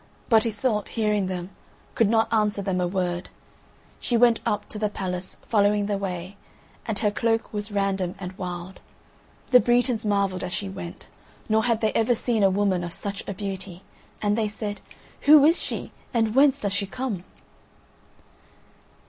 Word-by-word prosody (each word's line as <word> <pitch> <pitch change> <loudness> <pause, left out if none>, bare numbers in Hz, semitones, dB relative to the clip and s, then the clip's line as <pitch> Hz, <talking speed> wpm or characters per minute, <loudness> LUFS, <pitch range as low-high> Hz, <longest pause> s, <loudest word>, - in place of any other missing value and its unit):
But 225 -1 +5
Iseult, 215 -1 -1
hearing 210 -4 0
them, 180 0 -5 0.4
could 225 -3 +3
not 225 0 +2
answer 210 -2 +1
them 185 -1 -1
a 180 - +1
word. 180 -1 -2 0.7
She 240 - +1
went 235 -1 +5
up 210 - -1
to 210 - -4
the 210 -1 0
palace, 185 -2 -5
following 205 -1 +2
the 200 -1 -1
way, 185 0 -5 0.5
and 220 -3 -1
her 210 -1 +2
cloak 225 +1 0
was 210 +1 0
random 195 -3 -1
and 185 -1 -7
wild. 180 0 -6 0.7
The 250 - +9
Bretons 240 -1 +2
marvelled 200 -3 0
as 180 0 -2
she 200 - -1
went; 175 -3 -8 0.4
nor 220 +1 +2
had 230 -2 +1
they 220 -1 +1
ever 235 +2 +2
seen 220 -4 +2
woman 190 -2 +1
of 170 -1 -5
such 200 +2 -3
a - - -3
beauty, 190 -2 -6 0.4
and 205 0 +2
they 220 -1 +1
said: 205 0 -5 0.5
"Who 295 -1 +9
is 330 +3 +4
she, - - -4 0.2
or 230 - +4
whence 265 +5 +4
does 200 -2 -2
she 200 0 0
come?" 215 -4 -4
205 Hz, 165 wpm, -25 LUFS, 190-225 Hz, 0.7 s, The